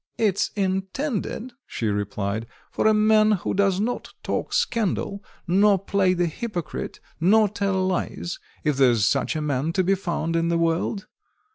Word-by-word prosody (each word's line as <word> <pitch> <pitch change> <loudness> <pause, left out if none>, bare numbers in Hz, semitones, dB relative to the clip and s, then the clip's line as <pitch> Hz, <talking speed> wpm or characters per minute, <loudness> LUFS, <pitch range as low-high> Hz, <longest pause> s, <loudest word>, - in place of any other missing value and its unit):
"It's 205 -4 +1
intended," 205 +5 -2
she 115 - -4
replied, 105 +1 -2 0.2
"for - - +1
a - - +6
man 215 0 +4
who 190 - -1
does 195 -1 +2
not 235 +4 -3
talk - - -2
scandal, 200 -2 0 0.2
nor 195 +3 +4
play 190 -1 +1
the 175 0 +1
hypocrite, 175 +1 -4 0.2
nor 210 +6 +5
tell 195 -2 0
lies, 180 -1 -2 0.2
if 150 -3 +1
there's 120 -6 +4
such - - +1
a 155 - -1
man 150 +2 -1
to 185 +1 +2
be 190 +2 +3
found 170 -4 -2
in 165 0 +1
the 170 0 +1
world. 170 +5 0
185 Hz, 155 wpm, -24 LUFS, 165-210 Hz, 0.2 s, a